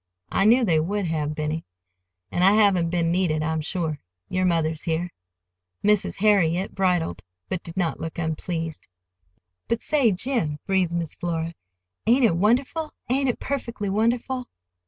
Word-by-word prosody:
"I 195 - +2
knew 240 +4 +6
they 165 -6 +3
would 200 +5 -1
have, 155 -2 -1
Benny; 155 +1 -2 0.7
and 175 - +1
I 195 +2 +7
haven't 200 -6 +4
been 170 -1 +1
needed, 170 -4 +1
I'm 160 0 -1
sure,—your 155 - -3
mother's 160 -3 +1
here." 170 +2 -2 0.7
Mrs. 210 -1 +2
Harriet 190 -3 +2
bridled, 175 - 0 0.3
but 185 - -2
did 170 +1 -10
not 175 -3 0
look 165 - -5
unpleased. 160 0 -3 0.8
"But, 230 - 0
say, 275 -7 +3
Jim," 190 - 0
breathed 190 -3 +1
Miss 170 -3 -2
Flora, 165 -1 -3 0.5
"ain't 245 +2 +5
it 200 - +3
wonderful—ain't 260 - 0
it 245 - -1
perfectly 235 -7 -3
wonderful?" 240 +5 0
180 Hz, 140 wpm, -24 LUFS, 160-210 Hz, 0.8 s, I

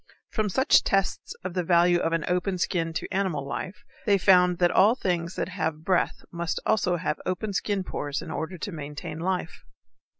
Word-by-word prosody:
From 215 -2 0
such 265 +8 +4
tests 195 -1 0
of 185 -1 -4
the 180 - 0
value 175 0 +4
of 165 - 0
an 165 -2 0
open 180 +1 0
skin 170 -2 0
to 165 - -4
animal 185 -8 -1
life 185 +7 -5 0.2
they 200 -1 +5
found 180 -2 +5
that 175 0 +3
all 210 +5 +5
things 175 -6 -2
that - - -2
have 160 -4 -3
breath 185 -2 +1
must 170 0 -2
have 180 -6 +1
open 200 +3 -2
skin 200 -1 -1
pores 145 -5 -3
in 165 0 -7
order 180 +3 -4
to 200 - -5
maintain 150 0 -6
life. 180 -1 -3
180 Hz, 185 wpm, -26 LUFS, 165-190 Hz, 0.2 s, they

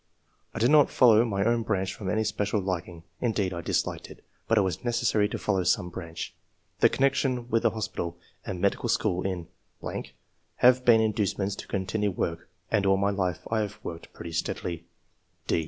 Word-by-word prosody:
I - - -3
did 120 +4 +3
not 150 -2 +6
follow 115 -3 +6
my 100 -3 0
own 115 0 +2
branch 100 -3 -1
from 100 -3 -5
any 110 +4 +1
special 105 0 0
liking 90 -3 -4
— - - -38
mdeed, 105 -6 0
I 85 - -4
disliked - - -2
it; - - -14 0.2
but 115 - +3
it - - +6
was 95 -4 -2
.necessary 120 -4 +1
to - - -3
follow 95 -3 0
some 90 +1 +1
branch. 85 -3 -6 0.5
The - - +6
connection 130 -3 +1
with 115 0 +2
an - - +3
hospital 105 -6 -4 0.3
and 90 - -5
medical 100 +5 0
school 90 -5 +1
in.... 90 -3 -3 1.1
have 125 +1 +5
been 115 -2 +6
inducements 105 -2 0
to - - -8
continue 100 +2 -1
work, 85 -3 -3 0.2
and 100 -3 +2
all 95 0 +4
my 100 +1 +1
life 95 -3 -1
I 110 - +2
have 105 -2 -3
worked 85 -1 -7
pretty 85 - -8
steadily.'' 85 +1 -3
100 Hz, 185 wpm, -27 LUFS, 90-115 Hz, 1.1 s, not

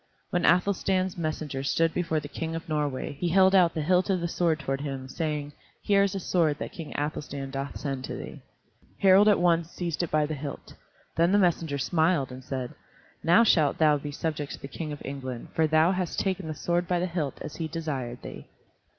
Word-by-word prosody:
When 175 -1 +2
Athelstan's 185 +1 +2
messenger 155 -5 -3
stood 165 +4 +1
before 165 -3 0
the 145 - -7
King 165 +2 -4
of 165 +1 -6
Norway 150 -4 -2
he 175 - 0
held 190 +2 +5
out 180 -3 +5
the 155 - -1
hilt 180 +4 +2
of 190 -2 +2
the 170 - -1
sword 165 -2 +1
toward 135 -1 -2
him, 135 -2 -5
saying 150 0 -3 0.3
"Here 200 -1 +4
is 200 -1 +1
a - - -1
sword 165 -5 +1
that - - -5
King 165 -3 -8
Athelstan 145 -2 -4
doth 135 +1 -4
send 135 -3 -3
to - - -5
thee." - - -8 0.6
Harald 195 +2 +6
at 210 - +6
once 170 -2 +2
seized 175 -3 -3
it 175 - -2
by 155 -1 +2
the 155 - -3
hilt. 145 -1 -7 0.4
Then 170 +2 +4
the 205 - +5
messenger 165 -6 +1
smiled 160 -1 +1
and 130 +1 -9
said, 130 -1 -4 0.5
"Now 175 +8 +6
shalt 155 -10 +3
thou 150 -2 +4
be 145 +1 -6
subject 150 -1 -3
to - - -8
the - - -7
King 150 +3 -5
of 145 - -7
England, 130 -3 -6
for 160 -1 +2
thou 155 +3 +4
hast 185 -2 -2
taken 190 -3 -1
the 155 - -4
sword 175 +3 0
by 180 - +1
the 180 - 0
hilt 165 -6 -3
as 150 - -7
he 165 - -2
desired 140 -7 -4
thee." - - -9
160 Hz, 215 wpm, -27 LUFS, 145-175 Hz, 0.6 s, Harald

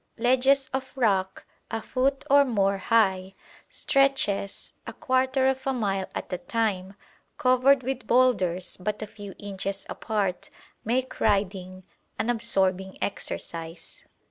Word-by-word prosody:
Ledges 260 +3 +3
of 265 0 -3
rock 195 -7 0 0.2
a 225 - -2
foot 265 +4 -1
or 280 +1 +6
more 200 -6 +1
high; 190 -3 +1 0.3
stretches, 270 -8 0
a - - -6
quarter 260 -2 +1
of 265 0 -1
a 270 - +2
mile 195 -6 -1
at - - -5
a 180 - -2
time, 195 -1 -2 0.4
covered 255 +1 +4
with 260 0 -4
boulders 190 -8 +2
but 210 +3 -3
a - - -3
few 205 -1 -10
inches 195 -1 -4
apart, 205 -5 -2 0.3
make 255 +3 -1
riding 190 -3 0 0.3
an 240 - 0
absorbing 190 -5 0
exercise. 165 -4 -5
215 Hz, 125 wpm, -26 LUFS, 190-255 Hz, 0.4 s, or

